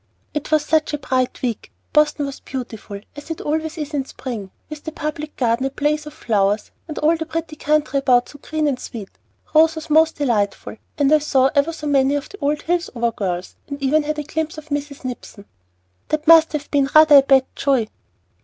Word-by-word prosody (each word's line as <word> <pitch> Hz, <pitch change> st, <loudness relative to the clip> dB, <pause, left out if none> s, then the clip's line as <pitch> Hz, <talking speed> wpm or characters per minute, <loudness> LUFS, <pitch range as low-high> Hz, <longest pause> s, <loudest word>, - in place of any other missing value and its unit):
"It 300 Hz, -, -4 dB
was 305 Hz, -1 st, +3 dB
such 310 Hz, 0 st, +1 dB
a -, -, -4 dB
bright 255 Hz, -2 st, -1 dB
week! 235 Hz, -4 st, -3 dB, 0.2 s
Boston 300 Hz, -1 st, +3 dB
was 275 Hz, -1 st, -6 dB
beautiful, 220 Hz, -6 st, -7 dB
as 290 Hz, +2 st, -10 dB
it 325 Hz, -, -4 dB
always 315 Hz, +2 st, -2 dB
is 300 Hz, -1 st, -5 dB
in 280 Hz, -2 st, 0 dB
spring, 230 Hz, -8 st, -6 dB, 0.2 s
with 305 Hz, -1 st, -9 dB
the 315 Hz, -, -5 dB
Public 305 Hz, 0 st, -5 dB
Garden 245 Hz, +1 st, +1 dB
a -, -, -3 dB
blaze 300 Hz, +2 st, -1 dB
of 300 Hz, -, -9 dB
flowers, 205 Hz, -2 st, 0 dB, 0.2 s
and 310 Hz, -, -7 dB
all 315 Hz, +2 st, +3 dB
the 320 Hz, -1 st, -5 dB
pretty 325 Hz, -1 st, -4 dB
country 295 Hz, -2 st, +1 dB
about 250 Hz, -3 st, +3 dB
so 290 Hz, -, -13 dB
green 310 Hz, 0 st, -2 dB
and 265 Hz, -3 st, -1 dB
sweet! 215 Hz, -6 st, -8 dB, 0.4 s
Rose 320 Hz, +1 st, +5 dB
was 315 Hz, -1 st, -7 dB
most 320 Hz, +1 st, +4 dB
delightful; 220 Hz, -7 st, -1 dB, 0.2 s
and 285 Hz, 0 st, +3 dB
I 310 Hz, -, +6 dB
saw 270 Hz, -3 st, +2 dB
ever 285 Hz, +2 st, +2 dB
so 315 Hz, -2 st, -8 dB
many 280 Hz, -1 st, +3 dB
of 290 Hz, 0 st, -4 dB
the 405 Hz, -, -12 dB
old 295 Hz, +1 st, 0 dB
Hillsover 295 Hz, -9 st, -1 dB
girls, 180 Hz, -2 st, -3 dB
and 280 Hz, -1 st, -6 dB
even 285 Hz, +3 st, +2 dB
had 305 Hz, +1 st, -3 dB
a 300 Hz, -, -2 dB
glimpse 315 Hz, +1 st, -3 dB
of 310 Hz, 0 st, -10 dB
Mrs. 285 Hz, -1 st, -4 dB
Nipson!" 235 Hz, -4 st, -7 dB, 0.6 s
"That 310 Hz, 0 st, -1 dB
must 325 Hz, -1 st, +7 dB
have 295 Hz, -1 st, -4 dB
been 280 Hz, -2 st, +2 dB
rather 310 Hz, -2 st, +9 dB
a -, -, +9 dB
bad 270 Hz, -1 st, +4 dB
joy." 270 Hz, -5 st, +1 dB
290 Hz, 210 wpm, -21 LUFS, 260-310 Hz, 0.6 s, rather